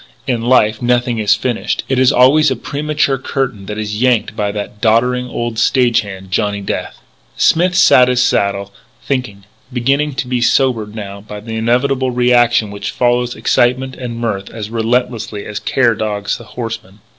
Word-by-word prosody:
In 125 -4 -1
life 110 -3 +2
nothing 120 -1 +1
is 105 -2 +3
finished. 120 +2 -2
It 135 -1 0
is 130 -1 +5
always 135 +5 +5
a - - -1
premature 145 -2 -1
curtain 125 -7 -3
which 105 - -5
is 105 0 -4
yanked 120 -4 +1
by 105 -1 -1
that 105 0 -6
doddering 125 +3 +2
old 120 -2 -3
stage 120 -1 +3
hand, 95 -2 -10
Johnny 105 0 0
Death. 100 - -4 0.4
Smith 175 +2 +3
sat 130 -8 +6
his 125 -1 +1
saddle, 100 -4 0 0.3
thinking, 125 -8 -3 0.3
beginning 135 +4 0
to 130 - -3
be 125 -1 -1
sobered 115 -4 +1
now 100 -2 -7
by 105 0 -9
the 110 +1 -7
inevitable 130 +4 +1
reaction 120 -3 +2
which 100 0 -5
follows 120 0 0
excitement 130 +2 +1
and 120 -2 -6
mirth 105 -4 -3
as 110 -1 -7
relentlessly 115 -2 -1
as 105 +1 -5
care 120 +2 +2
dogs 105 -2 -3
the 120 - -12
horseman. 110 -4 -7
120 Hz, 170 wpm, -16 LUFS, 105-125 Hz, 0.4 s, sat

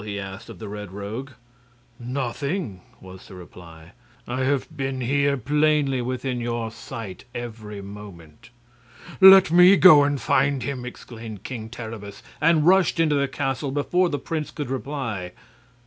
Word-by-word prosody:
he 100 -1 -5
asked 95 0 -8
of - - -10
the 110 - -8
Red 105 -2 -7
Rogue. 105 +7 -6 0.7
"Nothing," 125 - -4 0.2
was 95 0 -13
the 95 - -12
reply. 85 -2 -13 0.4
"I 130 +2 -2
have 140 +3 -1
been 135 -2 -3
here, 140 +3 +1
plainly 145 0 +1
within 125 0 -3
your 115 -1 -3
sight, 110 -3 -9
every 110 -4 -7
moment." 100 0 -12 0.7
"Let 190 -3 +9
me 180 +3 +7
go 155 -6 +8
and 145 -1 0
find 140 0 +1
him!" 130 -3 -4
exclaimed 115 -4 -9
King 115 -4 -6
Terribus, 110 -3 -9 0.2
and 160 -1 +3
rushed 185 -1 +4
into 160 -2 +3
the 140 -1 +1
castle 135 0 -3
before 175 +6 +1
the 145 - -2
prince 155 0 -4
could 145 -5 -6
reply. 125 -10 -4
125 Hz, 150 wpm, -23 LUFS, 105-145 Hz, 0.7 s, Let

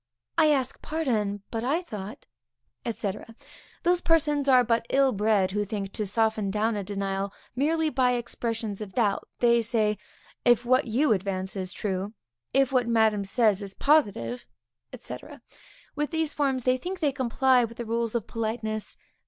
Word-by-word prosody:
_ 325 - +6
I 310 - +5
ask 270 -3 0
pardon, 215 -11 -1
but 225 -1 -3
I 305 +8 0
thought, 215 - -8 0.7
&c. 205 -3 -2 0.7
Those 355 0 +3
persons 295 -4 +2
are 255 -1 +7
but 230 0 0
ill 275 -1 +4
bred, 205 -3 +2
who 205 +1 0
think 200 -2 -4
to 210 - -2
soften 220 0 +1
down 215 +3 0
a 205 - -2
denial 195 0 -2 0.2
merely 315 +4 +1
by 250 -2 +2
expressions 230 -3 -3
of 200 -3 -7
doubt. 210 -5 +1
They 235 -1 +5
say, 215 -2 +1 0.4
if 240 0 +4
what 255 +1 +3
you 245 +3 +3
advance 190 -1 -3
is 185 -2 -3
true, 195 +2 -3 0.4
if 270 0 +3
what 250 -3 +2
madam 220 -3 +3
says 210 0 +2
is 195 -1 -7
positive, 250 -4 +1 0.5
&c. - - -6 0.8
With 295 0 -1
these 320 -2 -1
forms, 270 -4 0
they 255 +1 +3
think 365 +7 -5
they 295 -4 +2
comply 260 -1 +3
with 230 0 -5
the 240 - -4
rules 230 0 -1
of 230 - -1
politeness. 220 -1 -3
230 Hz, 165 wpm, -27 LUFS, 210-265 Hz, 0.8 s, are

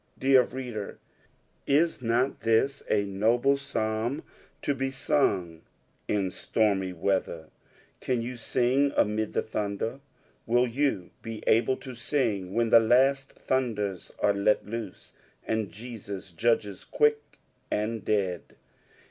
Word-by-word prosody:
Dear 135 -1 +5
reader, 120 -5 -5 0.7
is 155 +1 +2
not 120 +3 +1
this 115 +5 +2
a 105 -1 +3
noble 115 +7 +2
Psalm 115 -1 -2 0.4
to 145 - +1
be 135 0 -2
sung 95 - 0 0.5
in 100 -3 0
stormy 100 -4 0
weather? 85 -3 -2 0.5
Can 125 -2 -1
you 125 +2 -5
sing 130 +4 +1
amid 105 0 +1
the - - 0
thunder? 110 +3 -3 0.5
Will 120 +2 +4
you 125 -6 -1
be 115 -1 -7
able 120 +3 +3
to 130 -2 -9
sing 115 -7 -1
when 115 -1 +1
the 115 - +9
last 135 +4 +3
thunders 105 -8 -2
are 100 - +2
let 100 +1 +2
loose, 110 -3 -7 0.3
and 110 -3 -1
Jesua 100 -3 -8
judges 105 -3 0
quick 445 0 +1 0.3
and 110 +1 -2
dead 95 -5 -1
115 Hz, 125 wpm, -28 LUFS, 100-130 Hz, 0.7 s, the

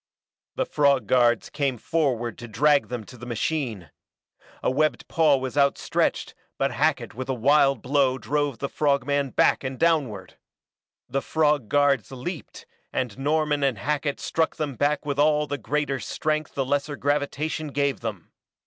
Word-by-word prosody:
The - - 0
frog 140 -5 +2
guards 120 0 +2
came 140 -4 -1
forward 120 -5 -1
to 120 - -8
drag 145 +6 +3
them 120 -2 -5
to 125 +4 -14
the 120 - -9
machine. 120 - -3 0.7
A - - +2
webbed 155 +3 0
paw 155 -4 +3
was 130 0 -5
outstretched 140 0 +1 0.2
but - - 0
Hackett - - 0
with 130 +3 -6
a 130 - 0
wild 135 0 +3
blow 135 -1 +2
drove 145 -1 -1
the 140 - -3
frog 140 -3 +1
man 140 -1 0
back - - +2
and 130 0 -4
downward. 140 - 0 0.7
The 135 +2 -1
frog 150 -8 +1
guards 140 -6 +2
leaped, 135 +6 -7 0.3
and 125 -6 -2
Norman 150 0 +1
and 135 -5 +1
Hackett 145 +5 -2
struck 160 -1 0
them 150 -3 -3
back 145 +5 0
with 140 -1 -2
all 150 0 +3
the 145 0 -4
greater 145 -2 -1
strength 155 +6 -2
the 135 - 0
lesser 145 +2 -1
gravitation 145 +2 -1
gave 140 -1 -1
them. 105 -7 -6
140 Hz, 160 wpm, -25 LUFS, 125-150 Hz, 0.7 s, drag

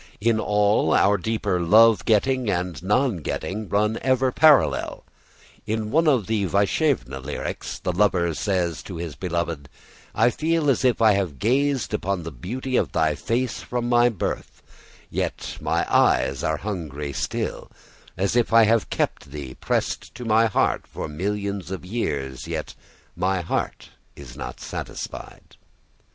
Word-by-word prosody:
In 110 +1 +2
all 105 -1 +2
our 100 +1 +4
deeper 105 -2 -1
love 110 +6 +5
getting 125 +2 +2
and 90 -3 -2
non 105 +4 +1
getting 100 +6 -4
run 105 +2 +1
ever 130 0 +2
parallel. 135 - +3 0.6
In 110 0 -2
one 160 +3 +3
of 135 -6 +4
our 105 -3 0
Vaishnava 100 - +1
lyrics 70 +3 -5
the - - -2
lover 90 -3 +2
says 85 -3 -1
to 95 - -8
his 85 -2 -5
beloved: 85 -3 -3 0.5
"I 115 +3 +4
feel 160 -1 +1
as 130 - -1
if 125 -3 +2
I 110 - +7
have 95 -8 -1
gazed 135 - +1
upon 100 -4 -1
the 80 - -6
beauty 125 - -3
of - - 0
thy 80 -1 +2
face 120 - -2
from 120 -1 -3
my 120 0 +5
birth, 110 -7 -5 0.5
yet - - -3
my - - 0
eyes 65 +2 +3
are 80 0 0
hungry 75 -8 -5
still: - - -3 0.5
as 95 +4 0
if 120 -1 +2
I 115 0 +7
have 110 0 +2
kept 70 - -2
thee 70 -3 -7
pressed - - -2
to 125 - -7
my 115 +1 +4
heart 110 - 0
for - - -6
millions 100 +3 -3
of 95 -1 -6
years, 70 - -3
yet - - -4 0.4
my 95 +1 0
heart 85 - -3 0.3
is 65 -4 -11
not 60 - -7
satisfied." - - -7
100 Hz, 150 wpm, -24 LUFS, 85-115 Hz, 0.6 s, I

